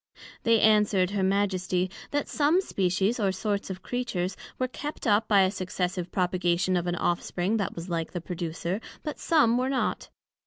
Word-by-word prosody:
They 230 -1 +4
answered, 210 -4 +4
her 205 -1 -1
Majesty, 190 -2 +1 0.2
That 290 0 -1
some 300 +5 +3
Species 195 - 0
or 200 -3 +2
sorts 200 +2 -2
of 190 0 -6
Creatures, 195 -7 -2 0.2
were 255 - 0
kept 290 +4 -6
up 215 -1 +3
by 200 -2 +5
a 190 0 +3
successive 180 -2 -3
propagation 180 0 +1
of 175 0 0
an 175 - 0
offspring 175 +4 0
that 200 -4 -2
was 170 +1 -6
like 165 -2 -2
the 175 - -3
producer, 175 +3 -4 0.2
but 300 - -5
some 250 -8 +3
were 255 +1 0
not. 270 -1 -1
190 Hz, 170 wpm, -27 LUFS, 180-225 Hz, 0.2 s, by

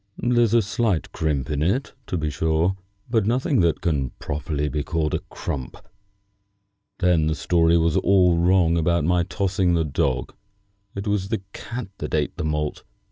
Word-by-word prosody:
"There's 120 -2 +2
a 115 - +5
slight 100 -4 -1
crimp 75 -2 -1
in 75 -1 -1
it, 100 - 0
to 90 - -2
be 75 -2 -2
sure, 80 +6 +1 0.3
but 110 -4 +1
nothing 130 +3 +1
that 85 -2 +2
can 70 -6 0
properly 75 0 -3
be 75 0 -2
called 75 +1 -1
a - - +1
crump. 65 -4 -5 1.2
Then 90 -4 +2
the 80 - 0
story 85 0 +3
was 80 -1 +2
all 90 -3 +4
wrong 85 -1 +3
about 85 0 +1
my 90 +2 +2
tossing 90 0 0
the 80 -1 +1
dog. 65 -3 -1 0.6
It 100 +1 -4
was 100 -2 -1
the 110 -4 -2
cat 120 -3 -6
that 75 - -3
ate 75 -2 -1
the - - -3
malt. 75 -1 -2
85 Hz, 170 wpm, -23 LUFS, 75-95 Hz, 1.2 s, a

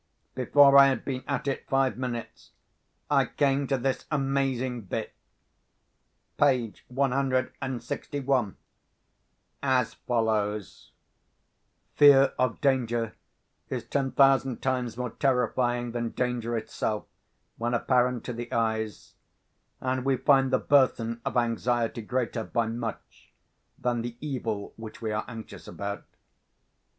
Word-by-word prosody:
Before 140 +2 +6
I 140 - +9
had 135 - -1
been 130 -2 -3
at 140 0 -2
it 135 - -3
five 135 -1 +2
minutes, 120 -2 -6 0.6
I 135 -2 +4
came 140 -1 +1
to 135 - +1
this 130 +1 -2
amazing 135 -5 -1
bit—page 125 +5 -4
one 135 +1 0
hundred 130 -1 0
and 130 -2 -3
sixty 145 - -4
one—as 130 +1 -3
follows: 105 -4 -2 1.0
"Fear 140 -2 +7
of 130 -2 +1
Danger 120 -5 +1 0.6
is - - -3
ten 135 -2 -1
thousand 135 -2 +3
times 125 -3 -1
more 125 -2 -3
terrifying 120 -2 0
than 120 0 -2
Danger 120 -2 -2
itself, 110 -1 -3 0.5
when 120 +1 -1
apparent 125 0 +1
to 125 - -5
the 120 +1 -6
Eyes; 110 -2 -2 0.7
and 130 0 -1
we 135 -1 +2
find 135 0 +4
the 130 - +3
Burthen 120 -5 +2
of 135 -3 -2
Anxiety 120 0 0
greater, 120 0 -2
by 115 +1 0
much, 115 0 -6 0.5
than 120 -1 -1
the 120 0 -6
Evil 115 -8 -4
which 110 -1 -9
we 110 -1 -3
are 105 +1 -2
anxious 115 -2 -9
about." 100 0 -5
125 Hz, 120 wpm, -27 LUFS, 115-135 Hz, 1.0 s, I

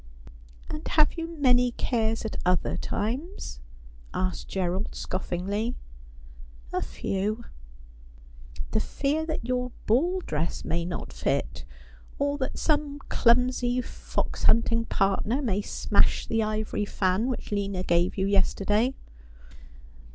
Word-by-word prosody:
'And 305 0 -6
have 305 -1 +4
you 330 -1 -3
many 250 -3 +4
cares 225 -2 0
at 220 - -3
other 180 -1 +2
times?' 270 - -3 0.6
asked 185 0 -1
G 195 - -3
erald 185 +2 -1
scoffingly. 200 +6 -2 0.5
' - - -18
A - - +1
few.' 210 +4 -2 0.7
' - - -13
The 220 - +2
fear 295 +7 -1
that 310 -7 -2
your 250 0 -1
ball 345 - +3
dress 160 - -2
may 170 0 0
not 175 0 -5
fit; - - -1 0.5
or 285 +1 0
that 260 - -2
some 295 -2 +1
clumsy 245 0 +3
fox 250 - -3
hunting 230 0 +4
partner 200 +6 +1
may 210 -8 0
smash - - +2
the 225 - +1
ivory 215 -1 -1
fan 190 +3 +1
which 255 -4 -3
Lina 200 -2 -1
gave 175 +1 +2
you 190 - +1
yesterday.' 205 +5 +2
220 Hz, 125 wpm, -27 LUFS, 185-255 Hz, 0.7 s, have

